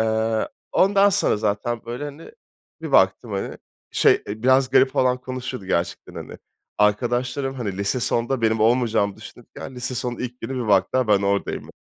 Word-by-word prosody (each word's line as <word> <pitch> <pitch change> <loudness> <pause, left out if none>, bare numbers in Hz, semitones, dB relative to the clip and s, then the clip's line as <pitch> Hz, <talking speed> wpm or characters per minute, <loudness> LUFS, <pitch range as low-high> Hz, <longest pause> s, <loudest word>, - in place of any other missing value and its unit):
Eee, 110 0 0 0.2
ondan 195 +1 +4
sonra 200 - +2
zaten, 110 +3 -2
böyle, 120 +4 -5
hani, 145 - -9 0.5
bir 160 - -5
baktım, 95 +1 +3
hani, 100 - -4 0.3
şey, - - +3
eee, 110 +2 -6
biraz 130 +1 +4
garip 130 0 +5
falan 125 -1 +2
konuşuyordu 125 -4 -6
gerçekten, 85 -2 -2
hani, - - -8 0.4
arkadaşlarım, 120 +6 0
hani 105 -7 -4
lise 100 +5 -1
sonda 120 +2 -1
benim 110 -1 +2
olmayacağımı 110 -3 +2
düşünürken, 130 - -11
lise 125 +1 -4
sonun 120 0 -3
ilk 125 0 -6
günü 135 - -5
bir 110 - -5
baktılar 105 +5 +2
ben 100 -1 +4
oradayım. 100 0 -2
120 Hz, 160 wpm, -22 LUFS, 105-130 Hz, 0.5 s, garip